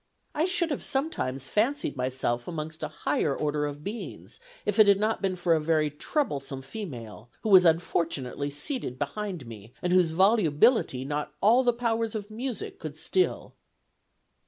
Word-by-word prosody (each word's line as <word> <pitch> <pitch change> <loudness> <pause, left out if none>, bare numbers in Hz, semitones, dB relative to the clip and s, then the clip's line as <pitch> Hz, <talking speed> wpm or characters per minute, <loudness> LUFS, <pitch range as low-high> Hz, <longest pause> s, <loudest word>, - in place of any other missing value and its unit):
I 310 - +1
should 360 -3 +2
have 290 - -3
sometimes 140 - -2
fancied 240 - 0
myself 125 -2 -2
amongst 155 -1 -5
a 155 - -1
higher 150 -1 -1
order 150 -1 -1
of 145 0 -7
Beings 215 +6 -7 0.3
if 210 +1 0
it 215 - +8
had 200 -1 +5
not 215 +2 0
been 190 -2 0
for 175 -1 +2
a 160 - +3
very 155 -1 +1
troublesome 140 - -2
female, 120 - -8
who 220 - -2
was 185 -2 +8
unfortunately 160 -5 0
seated 145 - -3
behind 170 +2 -4
me; 115 +1 -11
and 180 0 0
whose 180 -3 +5
volubility 175 - +3
not 145 +1 -3
all 235 +6 +5
the 245 - +4
powers 230 -2 -1
of 210 0 -5
music 240 0 -5
could 155 -1 -7
still." 370 - 0
165 Hz, 160 wpm, -27 LUFS, 145-220 Hz, 0.3 s, it